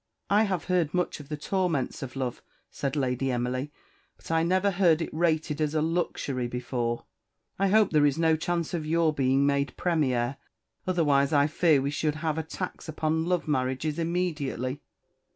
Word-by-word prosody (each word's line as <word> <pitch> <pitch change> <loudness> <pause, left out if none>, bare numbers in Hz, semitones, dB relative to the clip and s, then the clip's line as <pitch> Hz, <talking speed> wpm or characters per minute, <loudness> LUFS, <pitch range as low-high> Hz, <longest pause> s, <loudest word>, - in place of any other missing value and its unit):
"I 210 +2 +5
have 185 -5 -1
heard 180 -3 0
much 180 -3 -1
of 145 -1 -11
the 150 - -3
torments 170 -4 -1
of 130 -1 -6
love," 130 -2 -3 0.3
said 140 0 -3
Lady 130 -1 0
Emily; 125 +3 -2 0.5
"but - - -9
I 165 0 +3
never 185 +4 +2
heard 175 -4 +4
it 165 - -4
rated 155 -2 0
as 155 0 0
a 155 - +2
luxury 155 -6 -1
before. 120 -1 -3 0.5
I 195 - +3
hope 210 +1 +4
there 150 -2 +5
is 140 - 0
no 160 -1 +3
chance 170 +1 -2
of 170 -3 -1
your 160 0 +2
being 135 0 +2
made 140 -1 0
Premier, 135 -7 0 0.5
otherwise 145 -6 +3
I 145 -1 +5
fear 155 -2 +3
we 140 - -1
should 150 +1 -1
have 155 0 -1
a - - -2
tax 180 +1 -6
upon 160 +1 0
love 180 -2 0
marriages 135 +2 -1
immediately." 150 -6 -2
155 Hz, 175 wpm, -27 LUFS, 135-170 Hz, 0.5 s, I